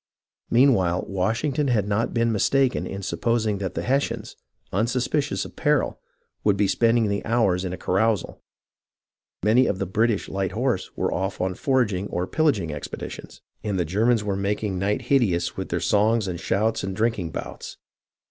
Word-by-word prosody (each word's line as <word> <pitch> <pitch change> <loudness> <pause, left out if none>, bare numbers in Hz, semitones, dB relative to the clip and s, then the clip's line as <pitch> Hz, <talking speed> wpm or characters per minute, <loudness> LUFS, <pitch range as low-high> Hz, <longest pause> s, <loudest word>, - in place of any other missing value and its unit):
I - - 0
TRENTON 125 - +7
AND - - +7
PRINCETON 135 - +5
I4I 95 -6 +2
Meanwhile, - - -4
Washington 125 +10 0
had 110 -6 +1
not 105 +3 0
been 115 0 +2
mistaken 130 +4 +2
in 100 0 -6
sup - - -4
posing 110 -3 +1
that 95 -2 -4
the - - -2
Hessians, 135 +3 -1 0.4
unsuspicious 125 +7 0
of - - -11
peril, 150 -2 +1 0.4
would 105 -2 +3
be 100 0 +3
spending 115 +3 +3
the 100 0 -1
hours 105 -6 +2
in 90 - -3
a 90 - -5
carousal. 100 +2 0 1.0
Many 115 +5 +4
of 95 - 0
the 95 - -2
British 110 +3 +1
light 95 -1 -2
horse 115 -4 -1
were - - 0
off 95 +2 -2
on 95 0 0
foraging 105 -5 0
or 90 -1 -2
pillaging 105 - +1
expeditions, - - -7 0.2
and 100 -3 -1
the 90 - +1
Germans 110 +6 +2
were 100 -2 -1
making 100 -1 -1
night 105 +6 0
hideous 120 -10 +1
with - - -5
their - - -1
songs 110 +1 +2
and 90 -2 -4
shouts 110 +5 0
and 95 0 -3
drinking 110 -5 0
bouts. - - -7
105 Hz, 185 wpm, -24 LUFS, 95-120 Hz, 1.0 s, TRENTON